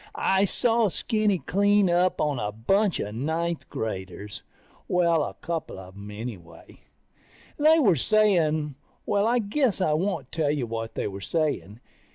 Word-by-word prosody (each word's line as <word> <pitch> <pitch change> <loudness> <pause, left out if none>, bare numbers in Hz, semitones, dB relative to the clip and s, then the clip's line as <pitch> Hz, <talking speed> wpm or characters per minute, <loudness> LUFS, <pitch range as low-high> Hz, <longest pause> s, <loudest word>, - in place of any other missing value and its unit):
I 195 +1 +2
saw 230 +2 +2
Skinny 210 +1 0
clean 200 +6 +2
up 180 +1 +2
on 145 -4 0
a 105 -1 -2
bunch 190 - +1
of 105 - -4
ninth 160 +7 -2
graders... 95 -1 -5 0.5
Well, 170 -3 +2
a - - -5
couple 165 - -5
of 95 0 -11
them 100 +1 -10
anyway. 105 -5 -9 0.8
They 310 +2 +6
were 215 - +4
saying... 160 - +2 0.3
Well, 205 +1 +1
I 240 +2 +3
guess 235 +1 0
I 160 -5 +2
won't 190 +6 -2
tell 155 -3 0
you 145 -4 0
what 115 0 -5
they - - -2
were 100 -1 -7
saying. 145 - -2
165 Hz, 155 wpm, -26 LUFS, -, 0.8 s, They